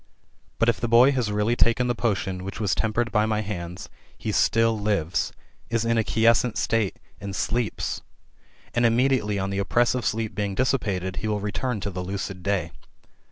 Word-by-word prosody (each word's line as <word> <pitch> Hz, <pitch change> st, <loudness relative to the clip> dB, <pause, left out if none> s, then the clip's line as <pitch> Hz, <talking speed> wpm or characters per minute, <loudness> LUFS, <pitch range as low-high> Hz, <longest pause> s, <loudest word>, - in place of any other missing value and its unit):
But 115 Hz, -, +2 dB
if 115 Hz, -, +2 dB
the 120 Hz, -, 0 dB
boy 120 Hz, +4 st, +6 dB
has 125 Hz, -6 st, 0 dB
really 105 Hz, +3 st, +1 dB
taken 115 Hz, +1 st, +3 dB
the 120 Hz, -, +1 dB
potion 95 Hz, -5 st, -1 dB
which 100 Hz, +1 st, -6 dB
was 100 Hz, -4 st, +1 dB
tempered 115 Hz, +2 st, 0 dB
by 105 Hz, -1 st, +2 dB
my 110 Hz, -1 st, 0 dB
hands, 90 Hz, -4 st, -6 dB, 0.3 s
he -, -, -3 dB
still 115 Hz, 0 st, +3 dB
lives, 100 Hz, -5 st, 0 dB, 0.4 s
is 115 Hz, 0 st, 0 dB
in 115 Hz, 0 st, +2 dB
a 110 Hz, -, +2 dB
quiescent 115 Hz, +2 st, +2 dB
state, 110 Hz, -4 st, 0 dB, 0.2 s
and 100 Hz, 0 st, -6 dB
sleeps; 115 Hz, +2 st, -1 dB, 0.7 s
^rid 120 Hz, -, +1 dB
immediately 115 Hz, -3 st, +2 dB
on 95 Hz, 0 st, -2 dB
the 100 Hz, -, -1 dB
oppressive 120 Hz, +4 st, +1 dB
sleep 110 Hz, -1 st, -1 dB
being 100 Hz, 0 st, -2 dB
dissipated, 95 Hz, -8 st, 0 dB
he 110 Hz, -, -3 dB
wiU 105 Hz, -1 st, 0 dB
return 110 Hz, +2 st, -2 dB
to 100 Hz, -, -3 dB
the 90 Hz, 0 st, -4 dB
lucid 95 Hz, 0 st, -4 dB
day. 90 Hz, -3 st, -1 dB
110 Hz, 180 wpm, -25 LUFS, 100-115 Hz, 0.7 s, boy